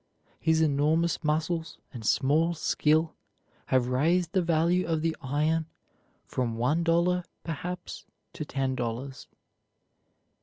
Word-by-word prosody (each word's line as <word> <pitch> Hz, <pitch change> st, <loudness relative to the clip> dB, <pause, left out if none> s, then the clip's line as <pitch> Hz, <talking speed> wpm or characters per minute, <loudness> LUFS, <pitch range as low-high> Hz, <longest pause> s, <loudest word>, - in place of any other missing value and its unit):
His 160 Hz, 0 st, +2 dB
enormous 155 Hz, +3 st, +2 dB
muscles 160 Hz, +2 st, -1 dB, 0.2 s
and 120 Hz, -3 st, -7 dB
small 155 Hz, +9 st, +2 dB
skill 155 Hz, 0 st, +1 dB, 0.5 s
have 125 Hz, -1 st, +2 dB
raised 165 Hz, +7 st, +2 dB
the 190 Hz, -2 st, +2 dB
value 170 Hz, +2 st, +2 dB
of 160 Hz, -2 st, 0 dB
the 165 Hz, -1 st, 0 dB
iron 155 Hz, +4 st, 0 dB, 0.6 s
from 120 Hz, -3 st, -2 dB
one 145 Hz, +8 st, +1 dB
dollar, 175 Hz, +2 st, +2 dB, 0.2 s
perhaps, 180 Hz, +3 st, -6 dB, 0.3 s
to -, -, -5 dB
ten 135 Hz, -2 st, -2 dB
dollars. 125 Hz, +2 st, -4 dB
160 Hz, 115 wpm, -28 LUFS, 135-170 Hz, 0.6 s, His